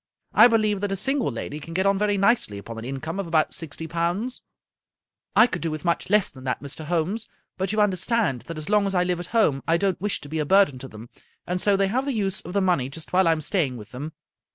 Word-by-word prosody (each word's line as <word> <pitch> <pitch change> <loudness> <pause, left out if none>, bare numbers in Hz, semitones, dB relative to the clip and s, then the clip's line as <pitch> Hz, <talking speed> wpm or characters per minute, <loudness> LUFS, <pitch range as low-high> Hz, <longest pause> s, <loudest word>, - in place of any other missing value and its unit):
I 220 - +9
believe 215 -4 +1
that 205 -1 -1
a - - 0
single 270 - +1
lady 145 +5 -5
can 165 +3 -9
get 190 +1 +1
on 195 0 +3
very 205 -1 +1
nicely 195 - +2
upon 115 +3 -8
an 115 - -7
income 135 +8 -4
of 195 - -3
about 160 -2 +2
sixty 160 0 -6
pounds." 175 +9 -2 0.5
" - - -55
I 220 - +8
could 180 -7 -4
do 165 - -1
with 155 +2 -5
much 170 +1 0
less 210 -1 +3
than 130 -1 -13
that, 125 - -1
Mr. 145 +2 -8
Holmes, 175 +7 -1 0.3
but 190 0 -2
you 215 - 0
understand 205 - +1
that 165 - -6
as 155 - -7
long 210 -1 +3
as 195 - -2
I 180 - +3
live 180 -1 -1
at 175 - -6
home 180 - +2
I 165 +1 +3
don't 190 -1 -1
wish 205 0 -1
to 145 - -10
he 160 +1 -2
a - - +1
burden 190 -6 +4
to 135 - -8
them, 115 +1 -12 0.3
and 180 0 -2
so 200 -1 +3
they 195 0 +2
have 255 +6 0
the 280 -3 -1
use 195 -3 0
of 175 - -9
the 200 - +2
money 175 -9 +1
just 160 +5 -10
while 185 -1 +4
I - - +5
am 160 -1 0
staying 150 -6 0
with 105 -1 -11
them. 145 +5 -6
180 Hz, 270 wpm, -24 LUFS, 150-200 Hz, 0.5 s, I